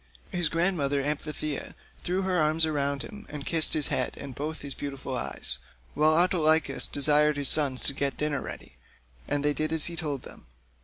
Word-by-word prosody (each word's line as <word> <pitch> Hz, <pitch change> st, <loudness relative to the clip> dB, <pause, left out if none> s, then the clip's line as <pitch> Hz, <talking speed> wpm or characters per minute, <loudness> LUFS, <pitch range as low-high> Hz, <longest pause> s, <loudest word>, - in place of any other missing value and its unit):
His 175 Hz, -3 st, 0 dB
grandmother 160 Hz, -5 st, 0 dB
Amphithea 150 Hz, 0 st, -4 dB, 0.3 s
threw 185 Hz, +2 st, -1 dB
her 185 Hz, -2 st, +1 dB
arms 155 Hz, +1 st, +2 dB
about 140 Hz, -2 st, -1 dB
him, 210 Hz, 0 st, -10 dB
and 145 Hz, -2 st, -7 dB
kissed 165 Hz, -2 st, +3 dB
his 150 Hz, -2 st, +3 dB
head, -, -, -1 dB
and 140 Hz, -2 st, -8 dB
both 155 Hz, +5 st, -5 dB
his 140 Hz, -1 st, -6 dB
beautiful 135 Hz, -2 st, -5 dB
eyes, 70 Hz, -, -1 dB, 0.3 s
while 155 Hz, +1 st, +4 dB
Autolycus 160 Hz, -3 st, +3 dB
desired 150 Hz, +1 st, +4 dB
his 140 Hz, -2 st, +4 dB
sons 140 Hz, -4 st, +1 dB
to -, -, +3 dB
get 140 Hz, 0 st, -2 dB
dinner 150 Hz, -3 st, -1 dB
ready, -, -, -9 dB, 0.5 s
and 145 Hz, 0 st, -1 dB
they 150 Hz, -, +2 dB
did 155 Hz, +1 st, -2 dB
as 160 Hz, -2 st, +5 dB
he 170 Hz, -, 0 dB
told 150 Hz, -6 st, -4 dB
them. -, -, -13 dB
150 Hz, 185 wpm, -27 LUFS, 140-160 Hz, 0.5 s, as